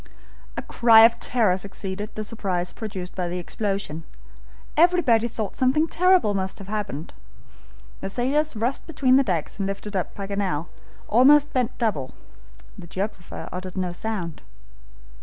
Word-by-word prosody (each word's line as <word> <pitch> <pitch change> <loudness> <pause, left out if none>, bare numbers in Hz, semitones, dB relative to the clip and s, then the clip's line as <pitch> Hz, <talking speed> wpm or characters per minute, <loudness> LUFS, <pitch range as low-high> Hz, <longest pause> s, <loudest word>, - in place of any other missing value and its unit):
A - - -3
cry 230 -2 +6
of 230 0 +3
terror 220 -7 +2
succeeded 195 +1 -6
the 215 - -3
surprise 190 -5 -2
produced 195 -5 -6
by 180 -2 -2
the 175 +1 -3
explosion. 195 -3 -3 0.7
Everybody 310 -9 +4
thought 220 -3 -4
something 265 +4 +3
terrible 365 - +3
must 190 -1 -2
have 195 -1 -10
happened. 205 -8 -4 0.9
The - - -4
sailors 275 +7 0
rushed 235 +5 -2
between 275 -5 +3
decks 185 - 0
and 195 - 0
lifted 200 +1 -5
up 185 - -2
Paganel, 195 -5 -2 0.4
almost 285 +5 +5
bent 250 -2 0
double. 195 - -1 0.6
The 170 - -9
geographer 190 0 -5
uttered 185 +1 -6
no 180 -1 -1
sound. 175 -4 -4
210 Hz, 140 wpm, -24 LUFS, 185-245 Hz, 0.9 s, cry